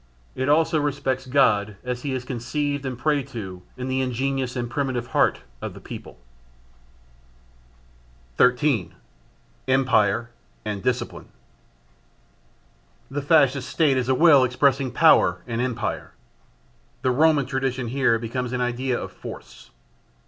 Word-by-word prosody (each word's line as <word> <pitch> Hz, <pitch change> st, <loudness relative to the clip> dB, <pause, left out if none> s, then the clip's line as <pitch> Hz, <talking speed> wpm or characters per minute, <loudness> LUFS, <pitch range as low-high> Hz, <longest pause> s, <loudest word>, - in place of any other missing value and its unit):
It 130 Hz, +2 st, -2 dB
also 160 Hz, +1 st, +3 dB
respects 135 Hz, -3 st, -2 dB
God 105 Hz, -7 st, +2 dB
as 125 Hz, -1 st, -4 dB
he 140 Hz, -, -3 dB
is 125 Hz, -1 st, -5 dB
conceived 140 Hz, +3 st, -3 dB
and 125 Hz, -2 st, -4 dB
prayed 145 Hz, 0 st, 0 dB
to 95 Hz, -8 st, -7 dB, 0.2 s
in 130 Hz, 0 st, -4 dB
the 130 Hz, 0 st, 0 dB
ingenuous 130 Hz, 0 st, -2 dB
and 120 Hz, -1 st, -2 dB
primitive 125 Hz, -1 st, -2 dB
heart -, -, +2 dB, 0.2 s
of -, -, -6 dB
the -, -, -10 dB
people. -, -, -10 dB, 2.2 s
13. 125 Hz, -, +2 dB, 0.7 s
Empire 120 Hz, -4 st, +2 dB, 0.3 s
and 105 Hz, -2 st, -3 dB
Discipline. 125 Hz, +2 st, -2 dB, 1.8 s
The 145 Hz, +1 st, -2 dB
Fascist 140 Hz, -3 st, +3 dB
State 150 Hz, -5 st, +2 dB
is 130 Hz, -1 st, -1 dB
a 130 Hz, -, +3 dB
will 145 Hz, -2 st, +6 dB
expressing 135 Hz, +1 st, +2 dB
power -, -, +4 dB
and 115 Hz, 0 st, -3 dB
empire. 120 Hz, -3 st, -3 dB, 0.9 s
The 130 Hz, -, +2 dB
Roman 150 Hz, +1 st, +3 dB
tradition 130 Hz, -2 st, -2 dB
here 130 Hz, -2 st, +2 dB
becomes 120 Hz, +2 st, -4 dB
an 125 Hz, -, -1 dB
idea 125 Hz, +1 st, -1 dB
of -, -, -6 dB
force. -, -, -11 dB
130 Hz, 125 wpm, -24 LUFS, 120-140 Hz, 2.2 s, will